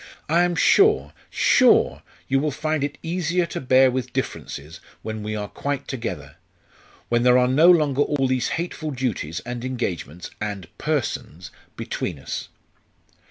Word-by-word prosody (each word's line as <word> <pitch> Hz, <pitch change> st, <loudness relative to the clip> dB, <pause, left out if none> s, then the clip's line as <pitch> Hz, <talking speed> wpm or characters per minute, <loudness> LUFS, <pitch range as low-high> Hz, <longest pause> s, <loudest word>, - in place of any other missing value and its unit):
I 170 Hz, +3 st, +3 dB
am 175 Hz, 0 st, +1 dB
sure 75 Hz, -, +4 dB, 0.2 s
sure -, -, +4 dB, 0.3 s
you 135 Hz, 0 st, +2 dB
will 150 Hz, +2 st, 0 dB
find 155 Hz, +1 st, -2 dB
it 145 Hz, 0 st, -3 dB
easier 175 Hz, +1 st, 0 dB
to 170 Hz, -, -5 dB
bear 130 Hz, 0 st, +5 dB
with 130 Hz, -1 st, -3 dB
differences 75 Hz, +4 st, -5 dB, 0.2 s
when 110 Hz, -1 st, -5 dB
we 105 Hz, +1 st, -4 dB
are 105 Hz, -1 st, -3 dB
quite 140 Hz, +5 st, -4 dB
together 95 Hz, -, -5 dB, 0.7 s
when 120 Hz, 0 st, +2 dB
there 125 Hz, 0 st, +5 dB
are 125 Hz, 0 st, +4 dB
no 150 Hz, +7 st, +5 dB
longer 150 Hz, -6 st, +4 dB
all 145 Hz, -2 st, +1 dB
these 130 Hz, -1 st, 0 dB
hateful 165 Hz, -2 st, -4 dB
duties 110 Hz, -, -3 dB
and 120 Hz, +2 st, -6 dB
engagements 90 Hz, -, -4 dB
and 100 Hz, -5 st, -5 dB
persons 125 Hz, -, -3 dB, 0.3 s
between -, -, -4 dB
us." -, -, -6 dB
130 Hz, 150 wpm, -23 LUFS, 105-150 Hz, 0.7 s, bear